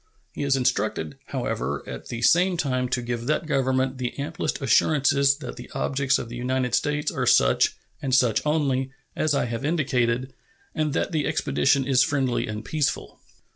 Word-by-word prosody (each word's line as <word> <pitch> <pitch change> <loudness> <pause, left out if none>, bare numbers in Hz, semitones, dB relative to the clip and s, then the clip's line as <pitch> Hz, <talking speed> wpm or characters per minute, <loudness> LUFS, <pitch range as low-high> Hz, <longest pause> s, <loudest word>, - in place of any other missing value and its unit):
He - - -6
is 140 -1 +2
instructed, 100 - -1
however, 70 +3 -3
at - - -7
the 120 0 -5
same 180 +4 +4
time, 130 -5 -1
to 125 -1 -1
give 120 0 -4
that 155 +2 0
Government 130 -2 0
the 125 -1 -3
amplest 160 +5 -3
assurances 140 +1 +3
that 135 -5 -8
the 125 - -10
objects 140 -1 +1
of - - -5
the 120 - -8
United 125 0 -1
States 150 0 0
are - - -2
such, - - +4 0.3
and 130 -2 +1
such 120 -5 +3
only, 140 -4 0 0.3
as 155 -2 +1
I - - +1
have 115 +2 -4
indicated, 130 -5 0 0.4
and 155 -3 -1
that 165 - -1
the 155 -4 0
expedition 140 -2 +1
is 130 -2 +3
friendly 135 -5 0
and 105 0 -5
peaceful. 155 -3 -2
135 Hz, 175 wpm, -25 LUFS, 125-145 Hz, 0.4 s, same